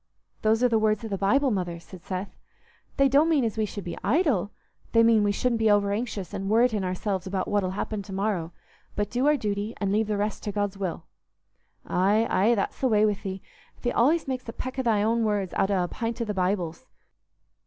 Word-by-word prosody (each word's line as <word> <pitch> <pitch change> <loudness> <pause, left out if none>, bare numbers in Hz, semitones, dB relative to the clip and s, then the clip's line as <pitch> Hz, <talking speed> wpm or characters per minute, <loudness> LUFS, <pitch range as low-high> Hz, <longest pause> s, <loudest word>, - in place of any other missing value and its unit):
"Those 220 +2 +2
are - - +6
the 225 -2 +2
words 215 0 +1
o' - - -3
the 200 - -2
Bible, 265 +7 +3
Mother," 175 -4 -2
said 175 +1 -13
Seth. 190 +1 -5 0.6
"They 275 -1 +5
don't 285 +5 +4
mean 300 -5 +3
as 220 - -2
we 220 -1 0
should 205 -1 -7
be 175 - -6
idle. 235 - +2 0.4
They 230 0 +6
mean 225 -1 +5
we 205 0 +2
shouldn't 235 +2 0
be 220 -1 +3
overanxious 205 0 0
and 195 -1 -3
worreting 220 -2 +3
ourselves 185 +1 -2
about 190 -1 -2
what'll 205 -3 +1
happen 215 -1 -3
to 195 - -11
morrow, 190 -4 -1 0.4
but 205 0 -2
do 250 +4 +1
our 300 0 +4
duty 210 -1 -3
and 200 -1 0
leave 215 +1 +1
the 210 -1 -1
rest 210 +1 -2
to 205 - -2
God's 205 -1 -2
will." 185 -4 -3 0.8
"Aye, 205 +5 +2
aye, 220 +5 +3
that's 200 - -3
the 265 - +3
way 215 -3 +4
wi' 210 - +2
thee: 190 -1 -5 0.4
thee 245 - +1
allays 305 +7 +2
makes 255 -3 -4
a - - -5
peck 255 +2 -5
o' - - +3
thy 220 -5 +2
own 230 +1 +1
words 205 -4 -1
out 195 - +1
o' 190 -3 +2
a - - -2
pint 230 +4 -4
o' 235 - -1
the 210 - -3
Bible's. 185 +3 -2
210 Hz, 225 wpm, -26 LUFS, 195-230 Hz, 0.8 s, are